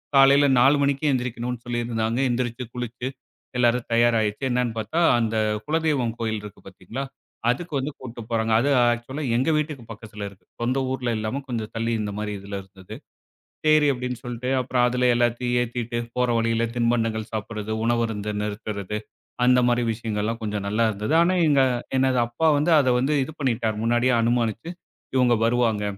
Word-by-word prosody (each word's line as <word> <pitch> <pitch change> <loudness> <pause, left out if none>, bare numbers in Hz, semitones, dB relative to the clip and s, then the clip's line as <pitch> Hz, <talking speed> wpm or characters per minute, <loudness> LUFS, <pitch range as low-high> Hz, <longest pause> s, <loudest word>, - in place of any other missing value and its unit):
காலைல 140 +1 +6
4 135 +4 +6
மணிக்கு 140 +1 0
எந்திரிக்கணுன்னு 125 -1 -3
சொல்லியிருந்தாங்க. 120 -1 -1
எந்திரிச்சு, 120 0 -2
குளிச்சு, 125 0 -5 0.5
எல்லாரும் 120 0 +2
தயாராயிச்சு. 115 -1 +2
என்னான்னு 120 -2 0
பாத்தா, 110 +10 -2 0.2
அந்த 115 -1 -1 0.3
குலதெய்வம் 150 -7 0
கோயில் 110 -2 -2
இருக்கு 105 -2 -11
பாத்தீங்களா, 95 +7 -7 0.5
அதுக்கு 160 +7 -2
வந்து 135 +3 -3
கூட்டிட்டு 120 -2 -8
போறாங்க. 115 -1 0
அது 135 +5 +1 0.2
ஆக்சுவலா 125 +5 -4
எங்க 130 +5 +1
வீட்டுக்கு 150 -4 -3
பக்கத்தில 105 -1 -8
இருக்கு. 100 -1 -21 0.2
சொந்த 125 +3 0
ஊர்ல 130 -2 -2
இல்லாம, 110 +5 -2
கொஞ்சம் 115 -4 -3
தள்ளி 115 +1 -1
இந்த 105 -1 -3
மாரி 105 0 -3
இதில 100 +1 -6
இருந்தது. 95 -1 -12 0.7
செரி 155 -1 +5
அப்டின்னு 125 -1 -4
சொல்ட்டு, 125 +1 -4
அப்புறம் 125 -1 +1
அதில 125 0 +1
எல்லாத்தையும் 120 +1 0
ஏத்திட்டு, 120 0 -4 0.2
போற 125 0 +1
வழியில 115 0 +1
தின்பண்டங்கள் 115 -2 0
சாப்பிடுறது, 110 0 -4
உணவருந்த 115 -3 0
நிறுத்துறது, 105 -1 -4 0.5
அந்த 125 0 +5
மாரி 120 0 +2
விஷயங்கள்லாம் 110 0 -3
கொஞ்சம் 105 -2 -3
நல்லா 110 +3 +1
இருந்தது. 105 +6 -2
ஆனா 175 +2 +3
எங்க 140 -2 +4 0.4
எனது 130 -1 +2
அப்பா 120 +8 0
வந்து, 150 +4 +1
அத 130 -3 +3
வந்து, 140 +4 +1
இது 155 - -9
பண்ணிட்டார். 115 -5 0
முன்னாடியே 120 +2 +2
அனுமானிச்சு, 115 +5 0 0.5
இவுங்க 120 -2 +4
வருவாங்க. 115 -3 +1
120 Hz, 155 wpm, -24 LUFS, 110-125 Hz, 0.7 s, காலைல